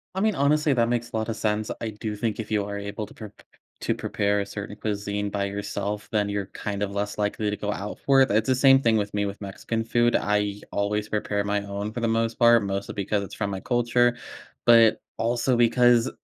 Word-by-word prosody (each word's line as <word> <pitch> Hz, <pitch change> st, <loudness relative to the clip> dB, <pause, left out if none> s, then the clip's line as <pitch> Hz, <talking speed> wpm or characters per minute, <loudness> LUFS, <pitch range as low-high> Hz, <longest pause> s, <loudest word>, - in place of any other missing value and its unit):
I -, -, -1 dB
mean, 215 Hz, -1 st, +2 dB
honestly, 150 Hz, +1 st, +3 dB
that 115 Hz, -2 st, +2 dB
makes 120 Hz, -1 st, -1 dB
a -, -, -5 dB
lotta 110 Hz, +1 st, -2 dB
sense. 110 Hz, 0 st, -1 dB
I 115 Hz, -, -2 dB
do 105 Hz, 0 st, -5 dB
think 110 Hz, +1 st, -2 dB
if 110 Hz, -, -5 dB
you 105 Hz, -1 st, +1 dB
are 100 Hz, 0 st, -5 dB
able 100 Hz, +1 st, -5 dB
to -, -, -15 dB
prep 105 Hz, -2 st, -10 dB
p -, -, -19 dB
p -, -, -28 dB, 0.2 s
to -, -, 0 dB
prepare 100 Hz, 0 st, 0 dB
a -, -, -3 dB
certain 100 Hz, 0 st, -7 dB
cuisine 105 Hz, -1 st, -3 dB
by 100 Hz, 0 st, -1 dB
yourself, 100 Hz, +1 st, -4 dB
then 105 Hz, -2 st, +1 dB
you're 100 Hz, -1 st, -2 dB
kind 105 Hz, 0 st, -4 dB
of 100 Hz, -, -2 dB
less 100 Hz, +1 st, -3 dB
likely 105 Hz, 0 st, -1 dB
to 105 Hz, -, -3 dB
go 105 Hz, 0 st, -2 dB
out 105 Hz, 0 st, -6 dB
for 135 Hz, -1 st, +5 dB
it. 130 Hz, -, +4 dB
That's 110 Hz, +2 st, +2 dB
the 130 Hz, -, +4 dB
same 135 Hz, +1 st, +6 dB
thing 115 Hz, -3 st, +3 dB
with 105 Hz, -1 st, -2 dB
me 105 Hz, 0 st, 0 dB
with 100 Hz, +1 st, -6 dB
Mexican 110 Hz, +3 st, -3 dB
food. 120 Hz, +1 st, +2 dB
I 105 Hz, 0 st, 0 dB
always 105 Hz, +1 st, -1 dB
prepare 105 Hz, -1 st, -1 dB
my 100 Hz, 0 st, 0 dB
own 100 Hz, +1 st, -4 dB
for 120 Hz, -, -5 dB
the 115 Hz, -, 0 dB
most 115 Hz, 0 st, 0 dB
part, 120 Hz, -2 st, +6 dB
mostly 100 Hz, 0 st, -3 dB
because 100 Hz, +1 st, -1 dB
it's 100 Hz, -, -9 dB
from 100 Hz, -, -2 dB
my 95 Hz, -1 st, -4 dB
culture, 120 Hz, +2 st, +2 dB, 0.5 s
but 115 Hz, -2 st, +6 dB, 0.2 s
also 120 Hz, +2 st, +1 dB
because 120 Hz, 0 st, +4 dB
105 Hz, 235 wpm, -25 LUFS, 100-120 Hz, 0.5 s, same